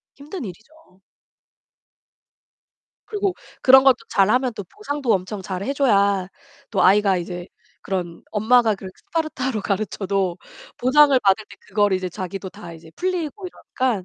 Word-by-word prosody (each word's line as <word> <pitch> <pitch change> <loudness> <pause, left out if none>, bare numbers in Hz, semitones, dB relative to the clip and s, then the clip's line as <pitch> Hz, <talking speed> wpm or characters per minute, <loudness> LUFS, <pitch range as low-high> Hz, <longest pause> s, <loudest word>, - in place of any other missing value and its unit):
힘든 295 +4 -8
일이죠. 220 - -13 2.1
그리고 410 -3 -1 0.3
그런 265 +1 +8
것도 265 -3 +6
잘하면 245 +6 +2
또 205 - -6
보상도 285 - -2
엄청 190 +2 -2
잘해 190 +7 -3
줘야 200 -8 +2 0.4
또 195 - +1
아이가 195 0 +4
이제 175 0 -5 0.4
그런 175 -3 -4
엄마가 220 +1 +3
그런 190 -1 -9
스파르타로 265 -8 -3
가르쳐도 195 -3 -1 0.4
보상을 275 +2 +5
받을 195 +2 +3
때 - - -13
그거를 205 -2 +1
이제 185 0 -3
자기도 190 +1 -6
다 185 -2 -11
이제 165 0 -13
풀리고 365 0 -3
이러니까 255 - -3
210 Hz, 305 characters per minute, -22 LUFS, 190-265 Hz, 2.1 s, 그런